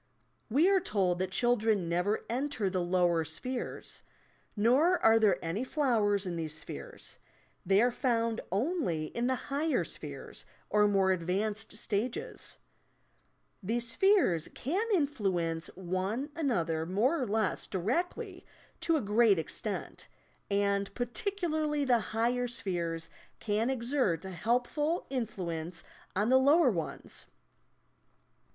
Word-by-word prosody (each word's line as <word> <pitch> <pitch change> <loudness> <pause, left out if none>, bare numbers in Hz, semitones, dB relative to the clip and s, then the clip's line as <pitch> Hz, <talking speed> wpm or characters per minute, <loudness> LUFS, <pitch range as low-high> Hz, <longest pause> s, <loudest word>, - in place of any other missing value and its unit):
We 290 +10 +4
are 390 -1 +5
told 190 - 0
that 185 0 -1
children 220 -3 +1
never 180 +5 0
enter 245 -5 -1
the 185 -1 0
lower 175 -2 +2
spheres; 245 - -5 0.5
nor 265 - +4
are 225 -5 +5
there 205 -5 +4
any 180 +9 -1
flowers 225 - +1
in 175 -2 -3
these 155 -2 -3
spheres, - - -9 0.4
they 195 +3 +4
are 245 - +3
found 230 -3 0
only 200 - 0
in 235 +1 0
the 260 - +2
higher 290 +5 0
spheres - - -7 0.3
or 210 0 +5
more 195 -2 +3
advanced 200 +5 -2
stages. 225 +3 -3 1.0
These 230 +4 -1
spheres 360 - +3
can 375 - -1
influence 195 - 0
one 190 - -2
another 170 - 0
more 245 - +2
or 255 - -1
less 220 +1 0
directly 230 - -2 0.4
to 330 -1 +2
a - - -1
great 210 -1 +4
extent, 160 - -4 0.4
and 200 0 +1
particularly 310 - -1
the 245 -3 +4
higher 240 +3 0
spheres 170 -7 -3 0.3
can 215 +3 0
exert 235 - 0
a 190 - -5
helpful 250 - 0
in 250 -4 0
fluence 170 -4 -5 0.3
on 205 +4 +1
the 260 +1 +6
lower 285 +1 +5
ones. 165 -6 -4
220 Hz, 125 wpm, -31 LUFS, 185-260 Hz, 1.0 s, the